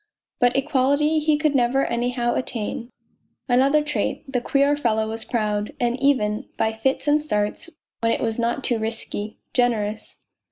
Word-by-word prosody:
But 245 Hz, +1 st, +3 dB
equality 285 Hz, +2 st, +2 dB
he 305 Hz, 0 st, +2 dB
could 305 Hz, -1 st, +1 dB
never 265 Hz, +1 st, +2 dB
anyhow 240 Hz, 0 st, 0 dB
attain. 235 Hz, -1 st, -2 dB, 0.6 s
Another 275 Hz, +4 st, +4 dB
trait: 295 Hz, 0 st, -2 dB
the 255 Hz, -3 st, -1 dB
queer 280 Hz, +3 st, +2 dB
fellow 220 Hz, -6 st, 0 dB
was 225 Hz, +1 st, -4 dB
proud, 210 Hz, -3 st, -1 dB
and 245 Hz, +1 st, 0 dB
even, 220 Hz, -7 st, +1 dB
by 220 Hz, -, +1 dB
fits 265 Hz, +6 st, -1 dB
and 295 Hz, +1 st, +4 dB
starts, 210 Hz, 0 st, -1 dB, 0.3 s
when 230 Hz, 0 st, +1 dB
it -, -, 0 dB
was 225 Hz, 0 st, -1 dB
not 235 Hz, +3 st, 0 dB
too 240 Hz, -2 st, 0 dB
risky, 220 Hz, -1 st, -4 dB, 0.2 s
generous. 220 Hz, -4 st, 0 dB
245 Hz, 155 wpm, -23 LUFS, 225-275 Hz, 0.6 s, Another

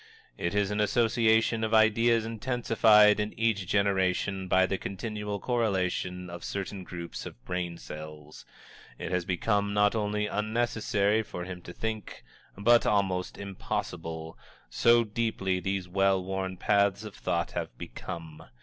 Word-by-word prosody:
It 85 Hz, +3 st, -2 dB
is 100 Hz, -1 st, +1 dB
an 105 Hz, -, -1 dB
association 110 Hz, +1 st, +2 dB
of 110 Hz, 0 st, +1 dB
ideas 115 Hz, +1 st, +4 dB
intensified 115 Hz, -2 st, +4 dB
in 105 Hz, +1 st, -3 dB
each 110 Hz, -5 st, +1 dB
generation 95 Hz, -1 st, +1 dB
by 95 Hz, +1 st, +4 dB
the 95 Hz, 0 st, -2 dB
continual 105 Hz, +1 st, -4 dB
correlation 95 Hz, -6 st, -1 dB
of 85 Hz, 0 st, -8 dB
certain 100 Hz, -1 st, -4 dB
groups 85 Hz, -1 st, -7 dB
of -, -, -13 dB
brain 90 Hz, -1 st, -3 dB
cells. 75 Hz, -1 st, -10 dB, 0.5 s
It -, -, -5 dB
has 90 Hz, -1 st, 0 dB
become 100 Hz, +2 st, 0 dB
not 105 Hz, 0 st, +4 dB
only 105 Hz, -1 st, -1 dB
unnecessary 110 Hz, -1 st, 0 dB
for 90 Hz, -5 st, -6 dB
him 90 Hz, 0 st, -7 dB
to 90 Hz, -, -9 dB
think, 110 Hz, +2 st, -5 dB, 0.3 s
but 120 Hz, +4 st, +5 dB
almost 95 Hz, -3 st, 0 dB
impossible, 80 Hz, -4 st, -5 dB, 0.3 s
so 120 Hz, 0 st, +5 dB
deeply 105 Hz, -4 st, -1 dB
these 95 Hz, 0 st, -2 dB
well 95 Hz, +1 st, +2 dB
worn 95 Hz, 0 st, -3 dB
paths 100 Hz, +1 st, +2 dB
of 105 Hz, -2 st, -8 dB
thought 85 Hz, -2 st, -2 dB
have -, -, -5 dB
become. 80 Hz, -2 st, -8 dB
100 Hz, 140 wpm, -29 LUFS, 90-110 Hz, 0.5 s, but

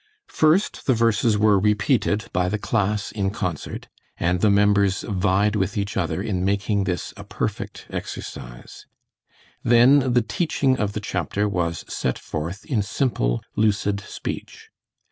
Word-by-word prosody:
First 160 Hz, +6 st, +2 dB
the 130 Hz, -, +4 dB
verses 115 Hz, -1 st, +2 dB
were 105 Hz, -1 st, +4 dB
repeated 105 Hz, +1 st, +1 dB
by 90 Hz, 0 st, +1 dB
the 105 Hz, -, -1 dB
class 105 Hz, -1 st, -1 dB
in 100 Hz, -3 st, -1 dB
concert, 95 Hz, -7 st, -4 dB, 0.3 s
and 90 Hz, +1 st, 0 dB
the 105 Hz, -, +4 dB
members 100 Hz, -1 st, +3 dB
vied 100 Hz, +2 st, +1 dB
with 95 Hz, -2 st, -1 dB
each 100 Hz, 0 st, -2 dB
other 95 Hz, +1 st, -1 dB
in 95 Hz, -5 st, -1 dB
making 100 Hz, +1 st, 0 dB
this 90 Hz, -2 st, -3 dB
a -, -, -9 dB
perfect -, -, -4 dB
exercise, -, -, -8 dB, 0.7 s
then 125 Hz, +2 st, +5 dB
the 120 Hz, -2 st, +4 dB
teaching 135 Hz, -2 st, +1 dB
of 105 Hz, -1 st, -1 dB
the 105 Hz, -, -4 dB
chapter 105 Hz, 0 st, -1 dB
was 85 Hz, -4 st, -2 dB
set 65 Hz, -, -2 dB
forth 85 Hz, +7 st, -5 dB
in 120 Hz, -7 st, 0 dB
simple, 100 Hz, -, -1 dB
lucid 105 Hz, -1 st, +1 dB
speech. 100 Hz, -, -7 dB
105 Hz, 145 wpm, -23 LUFS, 95-110 Hz, 0.7 s, then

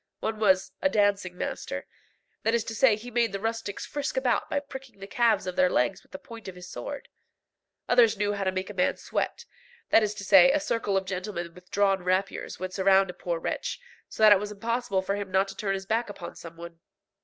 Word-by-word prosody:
One 220 Hz, -1 st, -3 dB
was 190 Hz, -3 st, +3 dB
"a 285 Hz, -, +3 dB
dancing 200 Hz, -5 st, +1 dB
master;" -, -, -4 dB, 0.6 s
that 225 Hz, +1 st, +2 dB
is 235 Hz, -, +1 dB
to 225 Hz, -, -5 dB
say 230 Hz, -1 st, +4 dB
he 235 Hz, +4 st, -10 dB
made 235 Hz, -2 st, +2 dB
the 195 Hz, -, -2 dB
rustics 225 Hz, -1 st, -3 dB
frisk 285 Hz, -2 st, -4 dB
about 255 Hz, -3 st, +1 dB
by 285 Hz, -, +1 dB
pricking 265 Hz, -5 st, -11 dB
the 195 Hz, -, -7 dB
calves 220 Hz, -1 st, +2 dB
of 185 Hz, -1 st, -4 dB
their 185 Hz, 0 st, +4 dB
legs 125 Hz, -6 st, +1 dB
with -, -, -28 dB
the 285 Hz, -, -6 dB
point 230 Hz, -7 st, -11 dB
of 190 Hz, -, -7 dB
his 180 Hz, 0 st, -10 dB
sword. 285 Hz, +7 st, -7 dB, 0.8 s
Others 230 Hz, -3 st, +5 dB
knew 205 Hz, 0 st, 0 dB
how 200 Hz, -1 st, -2 dB
to 190 Hz, -, +1 dB
make 185 Hz, +2 st, -4 dB
a -, -, -10 dB
man 180 Hz, -2 st, +1 dB
sweat; 475 Hz, -, -3 dB, 0.5 s
that -, -, +7 dB
is 210 Hz, -1 st, -1 dB
to 205 Hz, -, -7 dB
say, 270 Hz, +6 st, +7 dB
a 300 Hz, -, +2 dB
circle 230 Hz, -9 st, 0 dB
of 190 Hz, -, -1 dB
gentlemen 180 Hz, -2 st, -4 dB
with 180 Hz, 0 st, -17 dB
drawn 195 Hz, -2 st, +2 dB
rapiers 185 Hz, +2 st, -1 dB
would 185 Hz, 0 st, -5 dB
surround 195 Hz, -1 st, +4 dB
a -, -, -17 dB
poor 175 Hz, -1 st, -3 dB
wretch, 485 Hz, -, -3 dB, 0.3 s
so 220 Hz, -, -2 dB
that 215 Hz, -, +9 dB
it 200 Hz, -, +7 dB
was 210 Hz, +1 st, -5 dB
impossible 225 Hz, -2 st, -1 dB
for 195 Hz, +1 st, -1 dB
him 200 Hz, -1 st, -5 dB
not 190 Hz, +1 st, +2 dB
to 195 Hz, -, -8 dB
turn 195 Hz, -2 st, -1 dB
his 190 Hz, 0 st, -6 dB
back 225 Hz, +2 st, 0 dB
upon 195 Hz, -3 st, -8 dB
some 165 Hz, -1 st, -11 dB
one. 170 Hz, 0 st, -10 dB
205 Hz, 235 wpm, -27 LUFS, 190-230 Hz, 0.8 s, that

